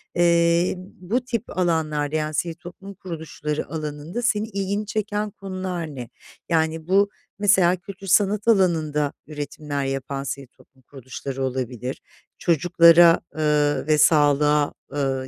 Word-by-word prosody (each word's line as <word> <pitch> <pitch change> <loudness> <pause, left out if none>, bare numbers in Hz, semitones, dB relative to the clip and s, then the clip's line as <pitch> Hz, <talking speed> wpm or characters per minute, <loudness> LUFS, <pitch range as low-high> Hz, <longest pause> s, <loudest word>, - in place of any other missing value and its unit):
eee, 170 0 +3
bu 185 +5 -4
tip 230 -5 -4
alanlarda, 155 -4 0
yani 155 0 -1
sivil 165 +2 -2
toplum 180 +3 -11
kuruluşları 160 -4 -5
alanında, 155 +6 -5
senin 215 -3 +1
ilgini 200 +2 -2
çeken 210 0 -2
konular 185 -6 -5
ne? 125 -3 -7 0.4
Yani 160 -1 0
bu, 200 +2 +3 0.3
mesela 190 -3 +4
kültür 195 +2 -11
sanat 205 +3 +2
alanında 160 -8 +2
üretimler 145 -1 -4
yapan 135 0 -3
sivil 140 0 -5
toplum 130 +1 -25
kuruluşları 135 +1 -7
olabilir, 130 -1 -4 0.4
çocuklara, 170 0 +5 0.2
ııı, 150 -1 +1
ve 155 -1 +4
sağlığa, 150 -1 +4 0.2
ııı, 135 -2 -1
160 Hz, 120 wpm, -23 LUFS, 145-185 Hz, 0.4 s, çocuklara